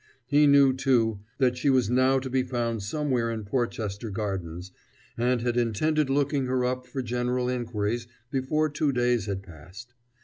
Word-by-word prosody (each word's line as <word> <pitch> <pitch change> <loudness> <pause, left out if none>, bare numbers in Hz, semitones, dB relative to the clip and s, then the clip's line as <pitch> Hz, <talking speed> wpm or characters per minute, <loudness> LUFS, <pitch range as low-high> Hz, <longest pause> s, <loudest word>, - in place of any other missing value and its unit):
He 145 +3 +4
knew, 140 -2 +6
too, 120 -5 +1 0.2
that 125 -2 +2
she 140 - +1
was 130 -5 +3
now 130 +2 +4
to 130 0 -3
be 130 0 +1
found 120 -3 -2
somewhere 125 +1 -1
in 110 -2 -4
Porchester 110 -2 -2
Gardens, 95 -4 -4 0.4
and 120 +1 +1
had 120 0 -1
intended 140 +6 +1
looking 140 -1 +1
her 125 -1 +1
up 125 0 -2
for 135 -2 -4
general 125 +1 -1
inquiries 120 -2 -2 0.2
before 150 +3 +1
two 150 -1 0
days 120 -4 +1
had 95 -1 -3
passed. 95 +7 -13
125 Hz, 165 wpm, -27 LUFS, 110-135 Hz, 0.4 s, knew